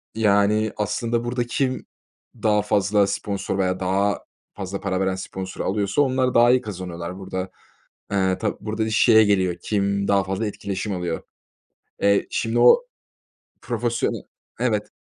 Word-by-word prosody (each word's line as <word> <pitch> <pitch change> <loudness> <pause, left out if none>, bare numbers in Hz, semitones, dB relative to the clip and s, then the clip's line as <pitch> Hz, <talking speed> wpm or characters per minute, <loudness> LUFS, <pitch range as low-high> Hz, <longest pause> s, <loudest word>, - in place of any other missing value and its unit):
Yani, 105 0 +3
aslında, 115 +3 -1
burada 120 +1 -1
kim 130 +1 -1 0.6
daha 105 -1 +3
fazla 100 0 +2
sponsor 100 0 -3
veya 95 -1 0
daha 100 +2 0 0.3
fazla 100 -1 -5
para 95 -2 -2
veren 95 -1 0
sponsoru 95 0 -6
alıyorsa 100 +5 +1
onlar 130 -2 +1
daha 120 +1 +6
iyi 125 0 +4
kazanıyorlar. 90 -3 -6
Burada, 95 -1 -4 0.6
eee, 95 -2 +1
tab 110 - -1
burada 110 +1 -2
şeye 110 0 +6
geliyor 95 -4 +2
kim 100 -1 0
daha 100 -1 +3
fazla 95 +3 -2
etkileşim 100 0 -4
alıyor. 85 -2 -3 0.8
Eee, 100 0 +3
şimdi 115 +1 -1
o 475 - +7 0.8
profesyone - - -1 0.4
evet. - - 0
100 Hz, 135 wpm, -23 LUFS, 95-110 Hz, 0.8 s, o